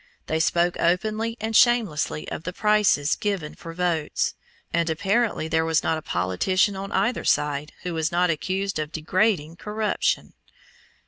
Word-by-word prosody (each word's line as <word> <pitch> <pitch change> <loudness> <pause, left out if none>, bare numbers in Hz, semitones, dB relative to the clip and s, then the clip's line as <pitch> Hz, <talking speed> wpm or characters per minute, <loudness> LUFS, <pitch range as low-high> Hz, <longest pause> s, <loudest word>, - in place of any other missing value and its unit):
They 160 - -1
spoke 170 +2 +2
openly 215 +6 0
and 220 +1 -3
shamelessly 215 -12 +3
of - - -4
the 180 +2 -5
prices 210 -9 +3
given 195 -7 -2
for 170 -4 -9
votes; 165 -3 -1 0.4
and 170 0 +1
apparently 195 +2 0
there 160 0 +1
was 160 -1 +1
not 160 - 0
a - - -12
politician 120 - +1
on 195 +1 -6
either 245 - 0
side 150 0 0
who 180 - -3
was 160 0 -1
not 175 0 +2
accused 190 +3 -2
of 155 0 -3
degrading 170 -1 0
corruption. 210 +1 -1
175 Hz, 150 wpm, -24 LUFS, 160-205 Hz, 0.4 s, shamelessly